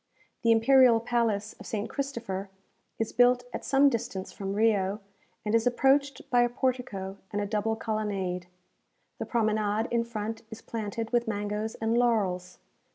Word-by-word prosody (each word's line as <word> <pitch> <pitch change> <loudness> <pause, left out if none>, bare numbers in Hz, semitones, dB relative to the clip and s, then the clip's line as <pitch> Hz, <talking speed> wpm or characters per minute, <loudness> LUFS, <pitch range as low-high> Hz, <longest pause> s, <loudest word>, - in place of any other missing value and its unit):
The 230 - +4
imperial 240 +1 +6
palace 225 -3 0
of - - -10
St. 215 -1 -2
Christopher 230 -9 -4 0.5
is 225 - -2
built 245 0 +4
at - - -4
some 275 +1 +4
distance 215 -7 -2
from 195 -2 -4
Rio, 205 -2 +2 0.5
and 210 - -1
is 230 +1 +3
approached 270 +2 +2
by 245 -1 +5
a 240 - +3
portico 245 -7 -2
and 205 - -2
a 205 - -1
double 215 +1 0
colonnade. 200 -5 -2 0.7
The - - -4
promenade 215 -1 +1
in 235 -1 +2
front 225 -1 -5
is 220 - -8
planted 225 0 -4
with 240 -1 +1
mangoes 210 +1 -2
and 225 +1 0
laurels. 205 -7 +1
225 Hz, 155 wpm, -28 LUFS, 205-240 Hz, 0.7 s, imperial